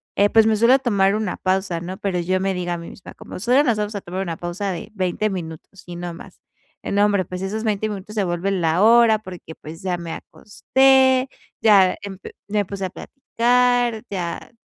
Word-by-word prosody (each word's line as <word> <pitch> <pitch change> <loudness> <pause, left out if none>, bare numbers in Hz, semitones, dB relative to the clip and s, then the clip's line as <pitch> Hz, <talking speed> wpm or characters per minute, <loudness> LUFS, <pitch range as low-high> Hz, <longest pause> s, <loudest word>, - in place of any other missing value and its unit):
eh, 205 0 +3
pues, 225 -1 +5
me 220 - +3
suelo 235 +5 +5
tomar 200 -5 +2
una 215 -4 -2
pausa, 185 -2 -1
¿no?, 185 +2 -6
pero 190 -3 -2
yo 185 +2 0
me 195 0 -1
digo 175 -1 -3
a 175 - -1
mí 170 - -9
misma, 190 - -12
como: - - -10
"Solo 250 +7 +3
nos 235 -6 +1
vamos 210 0 -3
a 200 - -4
tomar 185 +2 -5
una 170 -3 -4
pausa 185 +3 -4
de 180 - -6
20 195 +2 -1
minutos, 175 0 -8
y 175 - -7
no 175 -1 -5
más", - - -13 0.4
eh, - - -5
nombre, 200 -2 +2
pues, 180 +2 -7
esos 215 +4 -3
20 215 0 -1
minutos, 205 0 -7
se 205 - +1
vuelven 180 +2 -1
la 165 +4 +2
hora, 230 -1 +5
porque, 180 -5 -10
pues, 160 +2 -10
ya 180 -2 -2
me 170 -1 -6
acosté, 265 +3 +2 0.3
ya 200 -4 +5
emp 195 -1 -8 0.3
me 205 0 0
puse 195 0 -5
a - - -3
platicar, 245 -2 0
ya 180 -1 -5
195 Hz, 210 wpm, -21 LUFS, 180-220 Hz, 0.4 s, pues